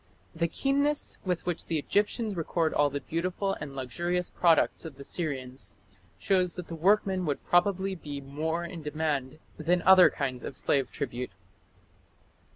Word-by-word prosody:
"The 170 0 0
keenness 280 - 0
with 180 -2 -1
which 175 -2 -2
the 165 - 0
Egyptians 205 - 0
record 165 -1 0
all 145 0 +3
the 145 0 -4
beautiful 185 +4 -2
and 140 -1 -6
luxurious 175 +7 -2
products 170 -2 +3
of 160 -4 -8
the 140 - -10
Syrians 135 -5 -4 0.4
shows 185 -3 +1
that 180 -2 -7
the 165 - -4
workmen 190 +2 +2
would 145 - -2
probably 190 +2 +2
be 150 -5 -6
more 155 +5 -3
in 170 -1 -7
demand 150 -2 -2 0.2
than 175 +3 +1
other 185 -1 +8
kinds 130 -4 -3
or 135 - -6
slave 135 0 +1
tribute." 125 -3 -4
165 Hz, 155 wpm, -29 LUFS, 145-185 Hz, 0.4 s, other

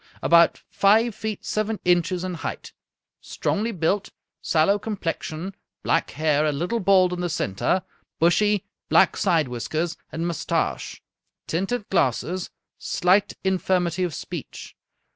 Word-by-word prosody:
About 170 0 +4
five 220 +4 +3
feet 215 0 -5
seven 215 0 -1
inches 175 0 +2
in 185 -1 -3
height; 165 - -6 0.5
strongly 220 +3 -2
built, 190 +2 0 0.3
sallow 185 +6 +2
complexion, 190 -3 -4 0.3
black 165 - +1
hair, 150 0 +1
a 155 - +2
little 175 +11 -1
bald 185 -2 +4
in 180 - -3
the 175 - -1
center, 150 - 0 0.3
bushy 200 +4 +3 0.2
black - - +5
side 165 -7 +2
whiskers 155 +8 -3
and 165 +1 -3
mustache; 170 -3 -2 0.4
tinted 195 +7 -2
glasses; 175 +3 0 0.3
slight 185 +3 +2
infirmity 185 -1 +1
of 170 -5 -2
speech. - - -8
180 Hz, 125 wpm, -24 LUFS, 165-200 Hz, 0.5 s, black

